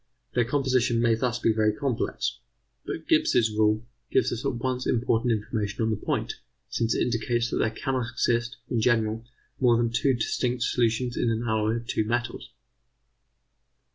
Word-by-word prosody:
Their 120 - +2
composition 130 -3 +1
may 115 -1 +3
thus 120 +1 0
be 115 -2 +2
very 110 -1 +3
complex: 125 0 -2 0.5
but - - -5
Gibbs' 110 -2 +3
rule 110 +1 +2 0.2
gives - - +2
us 120 - -5
at 135 -3 -1
once 125 +1 -2
important 120 0 +1
information 110 -1 -2
on 110 - +1
the - - +1
point, 105 - -3 0.3
since 115 -1 0
it - - +2
indicates 120 0 0
that - - 0
there - - +2
cannot 125 +1 -2
exist, 120 +1 0
in 115 - 0
general, 110 -1 +1 0.4
more 120 -3 +4
than 115 -1 +1
two 125 +3 +2
distinct 120 +1 -1
solutions 120 +1 +1
in 120 - +1
an 115 +1 -1
alloy 110 -1 +1
of 120 0 -5
two 120 - 0
metals. 120 +2 -3
120 Hz, 170 wpm, -26 LUFS, 110-125 Hz, 0.5 s, more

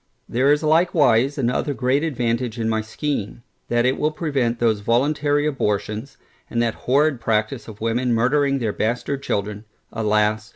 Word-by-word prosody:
There 130 +4 +2
is 150 +1 +2
likewise 155 -5 +3
another 135 +2 -1
great 130 +3 +1
advantage 120 -5 -1
in 110 - -1
my 110 0 0
scheme, 115 -1 -4 0.3
that 120 0 +2
it 130 +1 +1
will 150 - +2
prevent 140 -7 -1
those 115 -3 +1
voluntary 145 +6 +1
abortions, 110 -2 -2 0.3
and 115 - -2
that 115 -1 +1 0.2
horrid 140 -1 +3
practice 110 +3 -1
of 110 -1 -11
women 120 +2 0
murdering 135 +4 +2
their 115 -5 -2
bastard 125 +5 -2
children, 105 -4 -3 0.3
alas! 105 0 0
120 Hz, 155 wpm, -22 LUFS, 110-140 Hz, 0.3 s, likewise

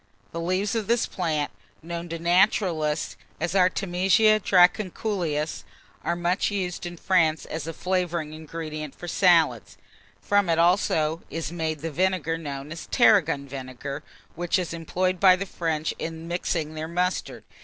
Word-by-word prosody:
The 165 - -4
leaves 185 +4 0
of 220 -3 -2
this 235 0 +2
plant, 155 -5 -2 0.3
known 170 +1 -5
to 165 - -3
naturalists 170 -3 +2 0.2
as 170 +2 -1
Artemisia 190 +3 +3
dracunculus, 180 -4 +1 0.4
are 170 - 0
much 175 +2 0
used 180 -3 -3
in 175 0 -8
France 165 -4 +2
as 160 -1 -5
a - - -2
flavouring 175 -3 -2
ingredient 155 -2 -6
for 175 - -9
salads. 165 - +3 0.4
From 200 - +2
it 165 - +3
also 165 -2 +2
is 165 -1 -4
made 160 -3 -3
the 165 +1 -3
vinegar 175 -1 0
known 140 -2 -6
as 170 - -7
tarragon 165 - +4
vinegar, 135 +1 -6 0.3
which 175 +3 0
is 180 -2 -3
employed 180 +2 -1
by 185 -2 +7
the 190 +2 -4
French 160 -4 -2
in 165 0 -5
mixing 165 -2 -2
their 155 0 -4
mustard. 180 +2 -2
170 Hz, 145 wpm, -25 LUFS, 155-185 Hz, 0.4 s, by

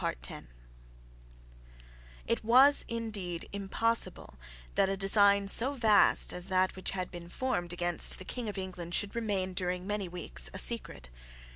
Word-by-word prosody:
It 230 0 -2
was 260 +6 +5
indeed 210 -7 -5
impossible 200 - 0 0.4
that 190 - +1
a 195 - -2
design 200 0 +3
so 250 +7 +3
vast 220 -6 +4
as 180 +1 -3
that 185 -1 0
which 185 - -5
had 185 -2 -5
been 175 -1 -10
formed 175 -6 -3
against 175 -1 +3
the 185 - -10
King 240 0 -5
of 205 - -7
England 180 -2 -5
should 205 -1 -1
remain 200 -5 -2
during 180 0 -3
many 205 -1 -3
weeks 175 0 -2
a - - -4
secret. 195 - 0
195 Hz, 140 wpm, -30 LUFS, 180-225 Hz, 0.4 s, was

